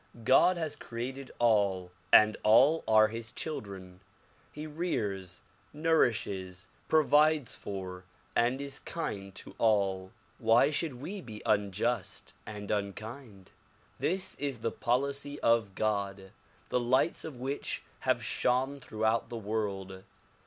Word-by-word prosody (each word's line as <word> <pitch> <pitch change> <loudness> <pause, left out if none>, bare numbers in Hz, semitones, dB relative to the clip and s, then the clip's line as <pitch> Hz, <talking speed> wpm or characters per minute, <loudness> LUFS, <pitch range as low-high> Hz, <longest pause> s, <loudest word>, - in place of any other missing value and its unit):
God 175 +10 +5
has 160 -3 -2
created 130 +3 -6
all 100 -6 +2 0.2
and 110 0 +7
all 135 +9 +5
are 110 -1 +6
his 115 0 -5
children. 95 - -6 0.5
He 150 +1 -7
rears, 105 - -3 0.3
nourishes, 110 - 0 0.2
provides 150 -2 +4
for 95 -2 -6 0.3
and 120 +3 +2
is 140 0 -4
kind 100 - -5
to - - -8
all. 100 -4 +2 0.3
Why 115 +5 +4
should 150 -2 -1
we 180 +11 -6
be 110 -8 -10
un 100 -1 +2
just 120 +5 -2
and 105 -1 -6
unkind? 105 +1 -5 0.5
This 190 +2 0
is 140 -5 -3
the 115 - +1
policy 140 +4 -1
of 115 -4 +2
God, 100 -3 -2 0.4
the - - +2
lights 130 +7 +2
of 160 -4 -6
which 135 +3 -3 0.2
have - - +1
shone 130 +3 0
throughout 110 -2 -1
the 120 - -5
world. 100 -3 -3
115 Hz, 125 wpm, -31 LUFS, 100-140 Hz, 0.5 s, and